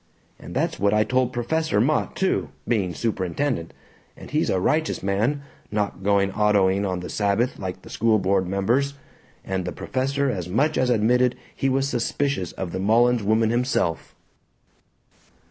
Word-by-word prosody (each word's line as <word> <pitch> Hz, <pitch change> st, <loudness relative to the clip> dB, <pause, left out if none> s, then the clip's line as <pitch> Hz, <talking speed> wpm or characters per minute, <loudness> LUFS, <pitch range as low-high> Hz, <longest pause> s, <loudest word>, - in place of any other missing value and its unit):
And -, -, -10 dB
that's -, -, -1 dB
what 100 Hz, +2 st, +2 dB
I 105 Hz, -, +4 dB
told 125 Hz, +1 st, +1 dB
Professor 160 Hz, +2 st, 0 dB
Mott, 145 Hz, +8 st, +1 dB
too, 190 Hz, 0 st, 0 dB, 0.2 s
being 100 Hz, -7 st, 0 dB
superintendent 110 Hz, -, -2 dB, 0.5 s
and -, -, -11 dB
he's -, -, +1 dB
a 95 Hz, -, +1 dB
righteous 155 Hz, -, 0 dB
man, 110 Hz, +9 st, 0 dB, 0.3 s
not 105 Hz, -3 st, -2 dB
going 100 Hz, 0 st, +2 dB
autoing 100 Hz, -1 st, +2 dB
on 90 Hz, -1 st, -3 dB
the 90 Hz, -, -6 dB
Sabbath 105 Hz, +4 st, 0 dB
like 95 Hz, -1 st, -5 dB
the -, -, -12 dB
school 110 Hz, -1 st, +2 dB
board 95 Hz, -1 st, +1 dB
members. 120 Hz, +9 st, 0 dB, 0.5 s
And 95 Hz, -1 st, -2 dB
the -, -, -4 dB
professor 135 Hz, +2 st, -1 dB
as 90 Hz, -5 st, -4 dB
much 140 Hz, +11 st, +1 dB
as 130 Hz, -1 st, +1 dB
admitted 125 Hz, +2 st, +3 dB, 0.2 s
he 135 Hz, -, 0 dB
was 135 Hz, +1 st, +1 dB
suspicious 130 Hz, -, -1 dB
of 90 Hz, -3 st, -5 dB
the 95 Hz, -, -3 dB
Mullins 115 Hz, +4 st, +3 dB
woman 110 Hz, +2 st, +2 dB
himself." 120 Hz, -, -1 dB
110 Hz, 160 wpm, -24 LUFS, 95-130 Hz, 0.5 s, I